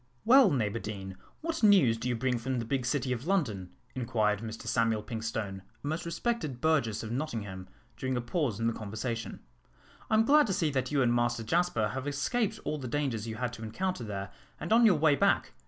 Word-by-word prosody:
"Well, 255 -1 +7
Neighbour 115 - 0
Deane, 95 -3 -6 0.3
what 330 0 -3
news 195 - +6
do 120 +2 -3
you 120 - +1
bring 125 +1 0
from 130 +2 -2
the 115 - -2
big 130 +1 -1
city 130 -1 0
of 125 +5 -6
London?" 115 - 0 0.2
inquired 110 -4 0
Mr 110 0 -7
Samuel 115 -3 +1
Pinkstone, 110 -3 -4 0.2
a - - -4
most 160 +3 -2
respected 170 - -2
burgess 140 -10 +1
of 110 - -6
Nottingham, 105 -9 -4 0.3
during 130 -1 -2
a - - +1
pause 120 - -1
in 115 - -1
the 115 - +2
conversation. 110 +2 -5 0.7
"I - - +3
am 220 +1 +4
glad 295 0 +5
to 195 - 0
see 160 -4 +1
that 130 -1 -1
you 140 -2 +3
and 120 -1 +3
Master 120 -1 +1
Jasper 120 -4 +1
have 135 +5 -4
escaped 195 - -1
all 155 - -2
the 130 - -5
dangers 125 -5 -2
you 110 - -4
had 125 +1 -3
to 115 - -9
encounter 130 +7 -3
there 100 -2 -5 0.3
and 165 +7 -1
on 230 0 +7
your 195 - +5
way 150 -1 +4
back. - - +2
125 Hz, 210 wpm, -30 LUFS, 110-155 Hz, 0.7 s, Well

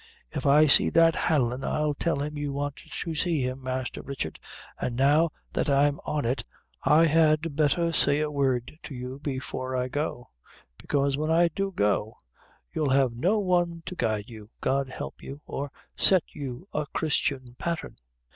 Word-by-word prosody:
If - - -2
I 150 +2 +7
see 140 - +6
that 165 -1 +5
Hanlon, 130 -5 +1
I'll 150 -1 0
tell 145 -1 -1
him 150 +1 -4
you 145 -1 -3
want 145 0 -3
to 165 - -6
see 160 -3 0
him, 130 +1 -3
Master 130 -1 -3
Richard; 130 - -5 0.4
an' 120 - -2
now 145 +6 +4 0.2
that - - 0
I'm 140 +1 +3
on 150 -4 -1
it, 125 +3 0 0.4
I 160 +2 +5
had 155 -1 +3
betther 160 +3 +2
say 150 -2 +3
a 150 -1 -1
word 135 0 -1
to 140 - -8
you 125 +2 -6
before 130 -2 -4
I 125 0 -1
go; 145 -3 -3 0.5
bekaise 140 -1 0
when 155 +1 -1
I 170 +1 +4
do 195 +4 -2
go, 105 - 0 0.6
you'll 150 -3 0
have 130 -2 +3
no 175 - +1
one 175 -4 +1
to 180 - -5
guide 110 - -1
you, 110 -3 -11
God 135 0 0
help - - -7
you, 140 +1 -8
or 140 +1 -4 0.3
to - - -2
set 185 -3 +6
you 140 +4 -6
a 150 -1 -1
Christian 135 -5 -1
patthern. 170 -1 -3
145 Hz, 175 wpm, -27 LUFS, 130-160 Hz, 0.6 s, I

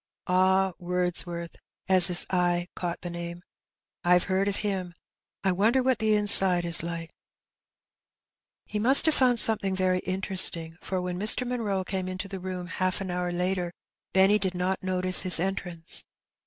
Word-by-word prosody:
Ah, 190 +1 +1
Wordsworth! 175 -1 -4 0.2
" - - -55
as 185 -1 +7
his 180 -2 +1
eye 175 -1 -1
caught 175 -1 -6
the 175 - -6
name. 170 0 -8 0.6
'^Vve 180 0 +2
heard 190 +1 -2
of 200 - -2
him. 185 -4 -5 0.5
I 190 - 0
wonder 225 +8 0
what 255 -3 -1
the 215 -1 +1
inside 190 -4 +5
is 170 -1 +3
like? 165 0 -7 0.8
" - - -67
He 210 - -3
mast 260 +8 +6
have 315 - +3
found 250 -3 +1
flomething 205 -4 0
very 185 -1 -1
interesting, 185 -3 +1
for 185 - -5
when 180 0 -6
Mr. 215 +5 +2
Mnnroe 210 -6 -4
came 185 -1 -5
into 185 +1 -7
the 195 -1 -8
room 180 -1 -7
half 185 +2 -3
an 190 -2 -6
hour 180 0 -4
later, 180 0 -3 0.4
Benny 195 +2 +2
did 190 -2 -4
not 185 +2 -3
notice 185 0 +4
his 180 -3 +5
entrance. 175 -3 -1
185 Hz, 170 wpm, -25 LUFS, 180-195 Hz, 0.8 s, as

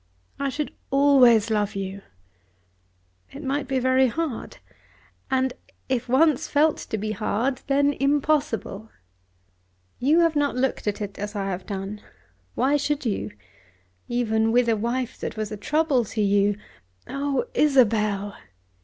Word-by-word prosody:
"I 280 - 0
should 295 +2 -4 0.2
always 255 -6 +5
love 210 -2 0
you." 195 0 -5 1.3
"It 285 +3 -9
might 275 0 -2
be 265 -1 0
very 260 +1 +3
hard: 300 -1 -4 0.7
and 260 -1 +1 0.4
if 255 -1 -1
once 300 +2 +3
felt 300 +1 +3
to 220 - -5
be 215 +1 -3
hard, 235 +4 -1
then 285 +1 +3
impossible. 275 -7 0 1.1
You 305 +7 +4
have 330 -2 +2
not 290 -2 +1
looked 255 -3 -1
at 210 0 -1
it 200 -1 -6
as 205 +1 -5
I 195 -1 -2
have 185 0 -6
done. 200 +1 -5 0.5
Why 275 +4 +2
should 290 0 -2
you? 195 - -1 0.8
Even 225 -2 +1
with 245 +1 +3
a 225 - +3
wife 240 +3 -2
that - - -5
was 215 0 -3
a - - -3
trouble 295 +3 +1
to 215 +1 -3
you 200 0 +2 0.3
" 90 0 -42
"Oh, 280 - -1
Isabel!" 215 -8 +2
245 Hz, 145 wpm, -24 LUFS, 210-280 Hz, 1.3 s, always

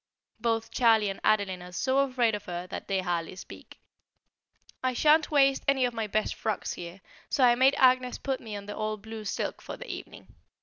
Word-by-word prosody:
Both 225 -1 -1
Charlie 225 -4 +4
and 195 - -9
Adeline 200 -4 +1
are 180 0 -10
so 260 +9 +1
afraid 255 -5 +2
of 210 - -4
her 175 0 -5
that - - -7
they 195 -1 0
hardly 175 -1 -2
speak. 190 - -12 1.0
I 255 0 +1
shan't 305 +4 +4
waste 275 -2 +3
any 270 -2 +3
of 245 - -2
my 225 -2 -2
best 215 +1 0
frocks 215 -3 -3
here, 175 +2 -9 0.3
so 270 - +1
I 245 -1 +7
made 260 +3 +4
Agnès 255 -1 +3
put 270 -2 -1
me 220 -3 -7
on 200 0 -7
the 205 - -6
old 215 -1 -4
blue 220 -1 -8
silk - - -3
for - - -8
the - - -9
evening. - - -9
225 Hz, 205 wpm, -28 LUFS, 200-255 Hz, 1.0 s, I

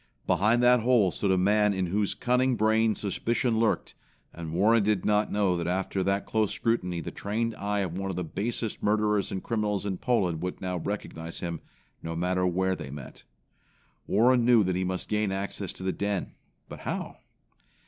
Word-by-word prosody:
Behind 115 +5 +3
that 125 0 +6
hole 115 -5 +3
stood 100 - -1
a 95 - +3
man 105 +2 +3
in 95 -1 0
whose 100 +3 0
cunning 125 +1 +2
brain 110 0 +2
suspicion 115 +3 0
lurked; 110 -6 0 0.4
and 80 -2 -6
Warren 105 +7 +4
did 105 -2 0
not 105 0 +2
know 100 -3 +2
that 85 -1 -2
after 95 +1 -1
that 100 +1 0
close 110 -2 0
scrutiny 90 -7 -1
the - - -6
trained 115 +3 -2
eye 100 0 -2
of 90 -3 -3
one 95 +1 -3
of 95 - -3
the 90 - -2
basest 110 +6 -3
murderers 105 -1 +1
and 95 - -4
criminals 105 -3 -1
in 95 -3 -3
Poland 95 -10 0
would 90 0 -4
now 90 -1 -3
recognize 85 -3 -5
him, 85 -2 -4 0.4
no 80 0 -5
matter 90 +2 +1
where 95 +1 +1
they 75 - -7
met. 70 -2 -10 0.8
Warren 120 +2 +4
knew 120 -2 +5
that 95 -1 0
he 95 - 0
must 95 0 -3
gain 105 -2 0
access 95 0 -3
to - - -10
the 95 -1 0
den, 100 -2 -2 0.3
but - - -9
how? - - -4
100 Hz, 190 wpm, -28 LUFS, 90-110 Hz, 0.8 s, that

